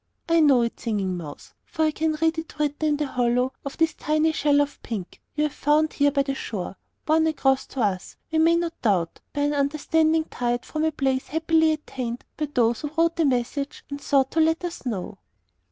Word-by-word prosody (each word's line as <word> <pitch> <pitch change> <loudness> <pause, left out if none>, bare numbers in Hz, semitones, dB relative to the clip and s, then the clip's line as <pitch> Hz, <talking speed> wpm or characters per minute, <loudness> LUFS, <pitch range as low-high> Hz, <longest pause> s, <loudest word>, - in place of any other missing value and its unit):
I 335 0 +4
know 275 -6 +5
it, 235 - -3
Singing 200 -5 -1
Mouse, 155 -5 -9
for 320 -2 -2
I 310 - +2
can 315 +1 0
read 320 +1 +1
it 320 -1 -9
written 300 +1 0
in 295 - +1
the 300 - -1
hollow 250 0 +1
of 275 - -6
this 325 -1 +2
tiny 310 +1 +1
shell 290 -2 +2
of 290 0 -1
pink 205 -7 -6
you 300 - +1
have 300 -1 -1
found 305 +2 +2
here 285 0 +3
by 280 -1 +1
the 275 0 -2
shore 200 -8 -5 0.3
borne 320 +1 +3
across 270 -4 +1
to 265 - -4
us, 190 -4 -1
we 320 - +2
may 330 +1 +5
not 335 -1 -2
doubt, 185 -8 +1
by 290 - -2
an 290 +1 +1
understanding 310 +3 +2
tide 245 -4 -2
from 310 0 -2
a 315 - +2
place 265 -3 -1
happily 320 0 +2
attained 250 -6 -5
by 300 - -2
those 235 -3 +2
who 295 - -3
wrote 335 0 +3
the 330 - +2
message 275 +2 -1
and 285 0 -5
sought 270 -2 +2
to 325 - 0
let 320 +2 +2
us 340 -6 -6
know. 195 -3 -4
290 Hz, 215 wpm, -24 LUFS, 250-315 Hz, 0.3 s, know